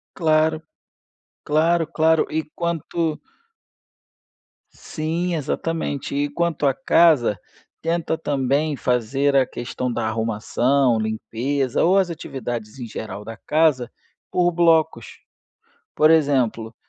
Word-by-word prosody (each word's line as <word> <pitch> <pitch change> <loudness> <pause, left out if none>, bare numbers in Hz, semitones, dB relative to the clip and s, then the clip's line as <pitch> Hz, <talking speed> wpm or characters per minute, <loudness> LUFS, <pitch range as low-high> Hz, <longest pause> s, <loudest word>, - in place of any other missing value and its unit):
Claro, 155 -1 +2 0.8
claro, 165 +2 +2
claro. 160 0 +2
E 160 +1 -1
quanto 170 -1 -2 1.5
Sim, 170 +3 -3
exatamente. 150 -2 -3
E 145 0 0
quanto 170 -1 -1
à 135 - +3
casa, 155 - +3 0.4
tenta 165 -1 -1
também 145 +1 0
fazer 135 +3 0
a 130 -1 +5
questão 125 +1 -4
da 115 -1 -2
arrumação, 115 +3 +1
limpeza 115 +5 -1
ou 185 +4 +4
as 190 -2 +2
atividades 120 -6 -6
em 120 - -6
geral 105 -2 -7
da 115 +1 -8
casa, 150 -6 +1 0.4
por 175 -1 +2
blocos, 160 - +2 0.9
por 155 +1 +5
exemplo: 130 -8 +1
145 Hz, 105 wpm, -22 LUFS, 120-160 Hz, 1.5 s, a